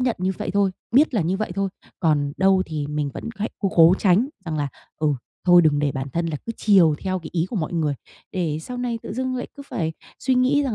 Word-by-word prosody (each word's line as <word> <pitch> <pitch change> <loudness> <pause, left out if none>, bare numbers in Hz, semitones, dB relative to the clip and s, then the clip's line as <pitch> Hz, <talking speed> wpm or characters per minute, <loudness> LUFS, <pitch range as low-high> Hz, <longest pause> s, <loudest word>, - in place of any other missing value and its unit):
nhận 250 -2 +1
như 185 +1 0
vậy - - -3
thôi, 200 0 +2 0.2
biết 275 +2 +4
là 215 - +3
như 175 +4 0
vậy 215 -3 -3
thôi, 195 0 0 0.3
còn 145 -3 +2
đâu 190 0 +4
thì 150 -3 -3
mình 150 -1 -2
vẫn - - -6
hãy 210 +2 -2
cố 195 - 0
cố 170 +2 +7
tránh 205 +7 +3 0.2
rằng 160 -2 -3
là, 145 -1 -1 0.3
ừ, 155 -1 +1 0.4
thôi 175 -1 +8
đừng 150 -2 +3
để 145 -1 +1
bản 135 +1 -4
thân 170 0 0
là 155 -3 -2
cứ 230 - -2
chiều 185 -8 +5
theo 185 -1 -2
cái 160 - -9
ý 170 0 0
của 220 - -5
mọi 160 -1 -2
người, 155 -4 0 0.4
để 165 -5 -1
sau 250 - -6
này 245 -2 -2
tự - - -6
dưng 255 +2 -2
lại 250 - -4
cứ 280 - -8
phải 160 -1 -2 0.3
suy 260 -1 +1
nghĩ 260 +3 +3
rằng 255 -6 -1
185 Hz, 255 wpm, -23 LUFS, 155-220 Hz, 0.4 s, thôi